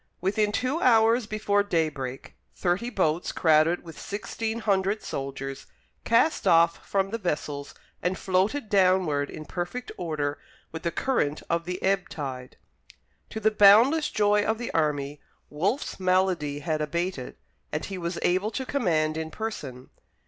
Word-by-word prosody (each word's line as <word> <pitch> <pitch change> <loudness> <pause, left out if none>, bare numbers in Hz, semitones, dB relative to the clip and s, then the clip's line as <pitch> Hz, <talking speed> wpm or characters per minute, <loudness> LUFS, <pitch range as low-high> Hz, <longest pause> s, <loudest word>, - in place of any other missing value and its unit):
Within 205 +3 +1
two 255 +9 -1
hours 230 -1 +4
before 210 -1 +1
daybreak 155 -9 -2 0.2
thirty 185 +7 0
boats, 175 -6 0
crowded 160 +1 +3
with 165 -2 -11
sixteen 220 +2 -4
hundred 200 -1 0
soldiers, 135 0 -5 0.4
cast 230 +8 +2
off 170 0 +4
from 195 0 -1
the 230 - -3
vessels 145 -6 -3 0.3
and 180 +2 -1
floated 195 +8 0
downward 185 -8 +2
in 155 - -8
perfect 180 - -5
order 150 -4 -2 0.3
with 160 - -6
the 170 - 0
current 165 - -1
of 170 0 0
the 180 +1 -4
ebb 195 0 +1
tide. 130 -4 -6 0.7
To 220 - -5
the 220 0 +3
boundless 225 +10 +6
joy 210 0 +2
of 220 +1 0
the 240 0 -5
army, 145 -2 -1 0.3
Wolfe's 195 - -1
malady 185 -6 +1
had 155 0 -1
abated, 170 -3 -3 0.4
and - - -2
he 195 -2 -6
was 170 0 -3
able 185 +4 +2
to 260 +3 -4
command 160 - 0
in 160 0 -3
person. 145 - -6
185 Hz, 145 wpm, -26 LUFS, 155-210 Hz, 0.7 s, boundless